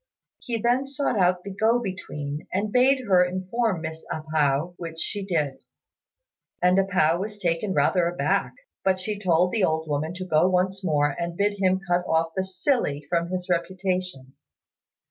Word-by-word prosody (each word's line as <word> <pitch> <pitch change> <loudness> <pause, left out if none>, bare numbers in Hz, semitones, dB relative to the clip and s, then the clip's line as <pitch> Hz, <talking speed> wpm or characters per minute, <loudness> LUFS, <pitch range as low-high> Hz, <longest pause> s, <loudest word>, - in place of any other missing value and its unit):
He 240 -4 -3
then 245 +4 +1
sought 275 -5 -1
out 180 0 +2
the 200 - -6
go 220 +4 +3
between, 150 -9 -5
and 205 +3 -1
bade 260 +2 +3
her 185 -4 +5
inform 185 +2 -1
Miss 160 0 -6
A 155 - -3
pao, 150 +3 +1
which 165 -1 -7
she 205 +3 -3
did; 155 -8 -1 1.0
and 180 +2 +4
A 195 - +3
pao 175 -3 +2
was 210 +2 -5
taken 180 +1 -1
rather 180 -2 +3
aback, 175 +1 0 0.3
but 190 -1 +2
she 205 +2 -4
told 180 -2 +2
the 220 -4 0
old 160 -2 +1
woman 155 +3 -2
to 185 0 -5
go 170 0 +3
once 185 +1 0
more 145 -4 +1
and 170 0 -3
bid 205 0 0
him 190 -1 +2
cut 175 0 +2
off 165 0 +1
the 190 - 0
"silly" 185 - -1
from 170 0 0
his 180 -1 -3
reputation. 180 -6 -2
180 Hz, 175 wpm, -25 LUFS, 165-195 Hz, 1.0 s, her